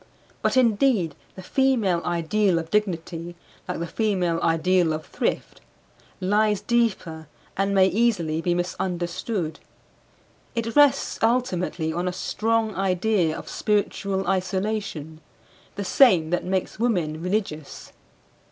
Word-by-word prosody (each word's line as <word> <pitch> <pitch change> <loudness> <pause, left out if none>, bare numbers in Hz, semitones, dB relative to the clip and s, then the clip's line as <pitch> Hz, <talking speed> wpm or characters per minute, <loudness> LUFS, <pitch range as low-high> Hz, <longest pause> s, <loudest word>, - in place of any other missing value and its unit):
But - - +1
indeed 225 - +3 0.2
the 185 - -9
female 225 -8 +1
ideal 175 +2 +1
of 165 0 -4
dignity, 175 -4 -2 0.3
like 180 - -3
the 170 - -3
female 180 -3 0
ideal 165 0 +2
of 155 0 -5
thrift, - - -3 0.6
lies 210 +2 +2
deeper 190 -10 -1 0.3
and 195 +1 0
may 190 -1 +6
easily 190 -7 +1
be 175 +1 0
misunderstood. 175 0 -3 1.0
It 230 -1 -2
rests 290 -2 +4
ultimately 185 -9 0
on 175 +2 -2
a 180 - -1
strong 220 +4 0
idea 185 -3 +1
of - - -9
spiritual 200 -2 -1
isolation; 185 -5 -2 0.5
the 200 - -4
same 180 - +4
that 175 - 0
makes 190 +2 -2
women 175 -10 0
religious. 180 -6 -3
185 Hz, 115 wpm, -24 LUFS, 170-215 Hz, 1.0 s, may